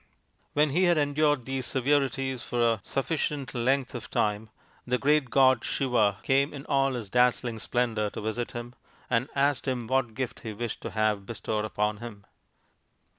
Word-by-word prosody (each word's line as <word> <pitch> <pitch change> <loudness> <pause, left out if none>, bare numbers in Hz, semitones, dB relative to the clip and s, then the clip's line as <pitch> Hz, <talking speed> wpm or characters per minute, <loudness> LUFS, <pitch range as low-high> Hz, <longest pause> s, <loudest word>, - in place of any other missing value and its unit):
When 150 0 +3
he 180 +6 +3
had 175 -2 +4
endured 145 -2 +2
these 135 -1 -3
severities 135 -1 0
for 120 - -3
a 115 -2 +3
sufficient 145 - -2
length 130 +2 0
of 120 -3 -7
time 105 +1 0 0.3
the 125 0 0
great 145 0 +2
god 130 -2 +4
Siva 110 -7 +1
came 140 +2 +2
in 140 - -8
all 135 -1 +2
his 115 -6 -5
dazzling 125 -2 +2
splendour 115 -3 0
to - - -7
visit 110 +3 -3
him, 120 +1 -6 0.4
and 125 +3 +1
asked 140 0 +1
him 125 -3 -1
what 125 -2 0
gift 130 -2 -3
he 110 - -6
wished 115 +1 -4
to - - -4
have 105 -2 0
bestowed 110 -2 -2
upon 105 0 -1
him. 105 -3 -9
125 Hz, 170 wpm, -28 LUFS, 110-135 Hz, 0.4 s, had